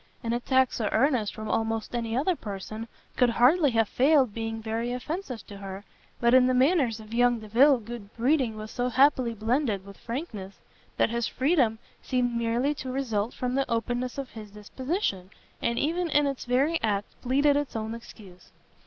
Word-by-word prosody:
An 230 0 -1
attack 260 +2 +2
so 215 -3 -1
earnest 240 -3 +1
from 215 -1 -6
almost 225 +1 -1
any 230 -1 -2
other 345 +7 +1
person 215 - -6 0.3
could 250 -1 +4
hardly 280 +7 +4
have 225 -3 +2
failed 265 -3 +3
being 225 0 -4
very 225 +2 -3
offensive 250 - -5
to 200 - -10
her, 195 0 -8 0.3
but 235 0 +3
in 255 -1 +6
the 255 - +2
manners 260 -4 +3
of 220 +1 -11
young 245 0 +3
Delvile 245 +6 +4
good 230 -2 -9
breeding 250 -2 +1
was 215 0 -7
so 245 0 -1
happily 255 -2 +3
blended 220 -2 0
with 200 -1 -12
frankness, 230 - -6 0.4
that - - +2
his 235 -1 -1
freedom 260 -5 +2 0.2
seemed 250 -2 0
merely 235 +5 +1
to 260 -3 -6
result 235 -5 -2
from 250 0 -2
the 275 +1 0
openness 245 +2 -1
of 275 -2 -5
his 215 -2 -9
disposition, 210 - -3 0.3
and 235 0 0
even 335 +5 0
in 295 -1 +3
its 275 -2 -3
very 275 +7 +1
act 205 -2 -1
pleaded 280 +3 +3
its 290 -3 -2
own 220 0 -3
excuse. 205 -5 -12
240 Hz, 180 wpm, -27 LUFS, 220-265 Hz, 0.4 s, in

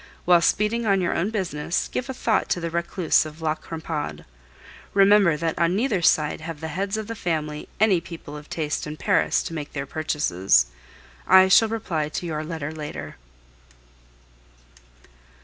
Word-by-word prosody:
While 175 -1 +5
speeding 215 +5 +1
on 195 -1 +3
your 175 -2 0
own 185 +5 0
business, 175 -6 -2
give 255 +1 -4
a - - -2
thought 225 -3 0
to - - +1
the 170 -1 -4
recluse 170 +1 +1
of 155 +1 -10
La 160 -1 0
Crampade. 160 -1 -6 0.7
Remember 195 -4 +5
that 165 0 -2
on 170 +1 +2
neither 215 -4 0
side 155 -2 +2
have 160 -1 -6
the 160 0 -5
heads 195 +4 -2
of 220 - -4
the 230 - -5
family 155 -7 -3
any 200 -5 +4
people 160 -3 -9
of 150 0 -10
taste 155 -2 -3
in 150 +1 -6
Paris - - +2
to - - -6
make 150 -3 -6
their 140 -1 -3
purchases. 115 - +1 0.6
I 190 0 +7
shall 220 +4 +6
reply 165 -9 -2
to 165 - -4
your 155 -2 -3
letter 155 -2 -5
later. 155 -2 -7
165 Hz, 165 wpm, -24 LUFS, 155-195 Hz, 0.7 s, I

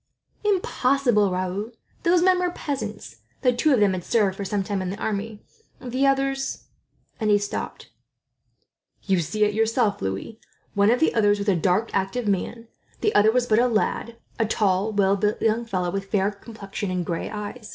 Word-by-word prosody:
"Impossible, 270 - +2
Raoul! 185 +4 -2 0.3
Those 345 0 +3
men 370 0 +4
were 360 0 +1
peasants, 215 - -5 0.3
though 250 - +5
two 250 +5 +2
of 260 - +4
them 205 -2 +4
had 180 -1 -4
served 205 -4 +1
for 200 - -7
a - - -3 0.2
time 195 0 -2
in 185 - -3
the 195 - -5
army; 210 0 -4 0.4
the 255 +2 0
others 270 0 0 0.3
" - - -41
and 215 -2 0
he 205 - +6
stopped. 205 0 -5 1.1
"You 190 -2 +2
see 210 +6 0
it 210 0 +2
yourself, 225 0 +1
Louis. 95 - -4 0.3
One 200 0 +3
of 245 +2 +3
the 320 - +3
others 205 -2 +3
was 205 0 -1
a 195 - +3
dark, 185 +6 +1
active 195 +4 -1
man. 225 +4 -2 0.3
The 425 - +1
other 215 +1 +5
was 250 +1 +1
but 220 -2 +3
a 245 - +4
lad 230 0 -1 0.2
a 225 - +3
tall, 205 -1 +1
well 200 -1 +3
built 210 +2 0
young 225 +1 +1
fellow, 185 -5 -2
with 195 +1 -3
fair 200 -1 +1
complexion 205 -1 -7
and 180 -1 -2
gray 165 0 -3
eyes. 210 +2 -7
210 Hz, 190 wpm, -24 LUFS, 195-240 Hz, 1.1 s, he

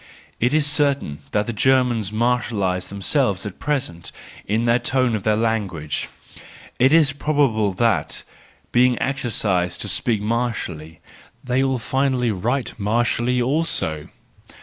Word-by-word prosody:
—It 120 +2 +2
is 155 -1 +2
certain 140 - +1
that 105 0 0
the 120 - -3
Germans 120 -3 +2
martialise 110 -6 0
themselves 100 +1 -1
at 100 - -7
present 125 - -3 0.4
in 110 +3 0
the 120 +1 +3
tone 125 -1 +1
of 105 - -3
their 105 +2 +2
language: 100 -10 -2 0.7
it 130 +2 +5
is 155 -3 +4
probable 135 -8 +1
that, 115 +2 0 0.5
being 125 0 +3
exercised 105 -9 -1
to - - -3
speak 115 -4 0
martially, 105 - -3 0.4
they 125 +1 +1
will 135 -1 +1
finally 130 0 0
write 115 +6 -2
martially 120 +4 +1
also. 125 - 0
120 Hz, 125 wpm, -21 LUFS, 100-130 Hz, 0.7 s, it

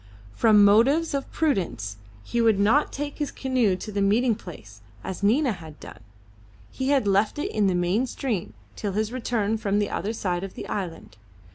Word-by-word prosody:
From 210 - +5
motives 270 +12 +4
of 275 -1 -3
prudence 170 - -1 0.3
he 235 - -1
would 220 -3 +3
not 225 +9 +3
take 290 +1 -5
his 295 - -1
canoe 255 -7 +1
to 215 +3 -7
the 200 0 -1
meeting 225 +5 +3
place, 105 - -11 0.2
as 190 - -6
Nina 245 +7 +3
had 160 -6 -9
done. - - -11 0.7
He 265 0 -3
had 275 -5 +3
left 200 +4 +2
it 295 - -2
in 210 -2 +1
the 185 - +1
main 180 +8 +1
stream 215 - -3 0.2
till 205 -2 -3
his 215 +2 -1
return 225 -4 -1
from 205 -2 0
the 205 -1 0
other 215 +3 -2
side 180 -5 -2
of 195 - -7
the - - -7
island. 165 - -5
210 Hz, 185 wpm, -25 LUFS, 190-250 Hz, 0.7 s, From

